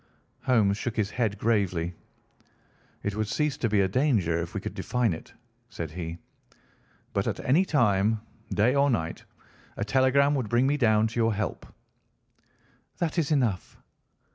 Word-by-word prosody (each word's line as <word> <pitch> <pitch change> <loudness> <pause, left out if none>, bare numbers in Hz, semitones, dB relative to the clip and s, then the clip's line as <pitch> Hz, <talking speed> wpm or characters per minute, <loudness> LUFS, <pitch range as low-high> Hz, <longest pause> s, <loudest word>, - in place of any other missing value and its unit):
Holmes 110 -7 +3
shook 120 0 -3
his 105 -2 0
head 110 -5 -1
gravely. 95 -6 0 1.1
"It 100 0 -2
would 110 0 -1
cease 150 +5 0
to 115 - 0
be 105 -2 +3
a 95 - +3
danger 95 - +1
if 85 - -7
we - - 0
could - - -6
define 125 -6 0
it," 80 - -9 0.4
said 85 -9 -6
he. 85 0 -5 1.0
"But - - 0
at - - -2
any 160 +9 +3
time, 110 - +2 0.3
day 110 +5 +2
or 140 0 +3
night, 85 -10 -2 0.5
a 100 - -2
telegram 135 +4 +3
would 130 -7 -1
bring 120 +3 +3
me 140 +2 +2
down 110 -4 +3
to 115 +1 -2
your 115 -2 +2
help." 105 -4 -3 1.3
"That 170 0 -1
is 155 - 0
enough." 120 -11 0
110 Hz, 160 wpm, -27 LUFS, 100-130 Hz, 1.3 s, Holmes